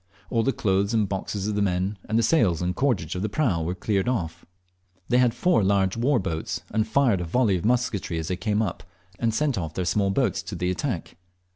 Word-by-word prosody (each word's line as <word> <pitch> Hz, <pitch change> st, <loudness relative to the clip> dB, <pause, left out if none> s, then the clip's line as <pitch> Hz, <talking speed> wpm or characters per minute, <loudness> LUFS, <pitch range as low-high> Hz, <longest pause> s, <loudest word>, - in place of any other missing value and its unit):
All 115 Hz, -, +2 dB
the 135 Hz, -, +2 dB
clothes 100 Hz, -1 st, 0 dB
and 105 Hz, -2 st, +2 dB
boxes 95 Hz, +1 st, -3 dB
of 105 Hz, -, -1 dB
the 105 Hz, -, 0 dB
men, 95 Hz, +1 st, 0 dB
and 110 Hz, -, +2 dB
the 115 Hz, -, +3 dB
sails 110 Hz, -, +3 dB
and 90 Hz, +1 st, -1 dB
cordage 110 Hz, -, 0 dB
of 90 Hz, -, -3 dB
the 105 Hz, -, -1 dB
prau, 105 Hz, -, 0 dB
were 90 Hz, +3 st, -2 dB
cleared 100 Hz, +3 st, 0 dB
off. 90 Hz, -8 st, -3 dB, 0.6 s
They 125 Hz, +1 st, +4 dB
had 125 Hz, -2 st, +4 dB
four 180 Hz, -, +3 dB
large 95 Hz, -1 st, +2 dB
war 125 Hz, +4 st, +2 dB
boats, 80 Hz, -6 st, -3 dB
and 110 Hz, 0 st, 0 dB
fired 125 Hz, -10 st, +2 dB
a -, -, -1 dB
volley 105 Hz, +4 st, +2 dB
of 90 Hz, -, -3 dB
musketry 115 Hz, -7 st, 0 dB
as 80 Hz, -1 st, -3 dB
they 90 Hz, -, 0 dB
came 105 Hz, +3 st, 0 dB
up, 105 Hz, -, -4 dB, 0.4 s
and 115 Hz, -1 st, +1 dB
sent 135 Hz, 0 st, 0 dB
off 80 Hz, -3 st, -5 dB
their 90 Hz, -, -1 dB
small 100 Hz, +3 st, +1 dB
boats 100 Hz, -1 st, +1 dB
to 90 Hz, +2 st, -7 dB
the 90 Hz, +1 st, -1 dB
attack. 90 Hz, -, -3 dB
100 Hz, 230 wpm, -25 LUFS, 90-115 Hz, 0.6 s, They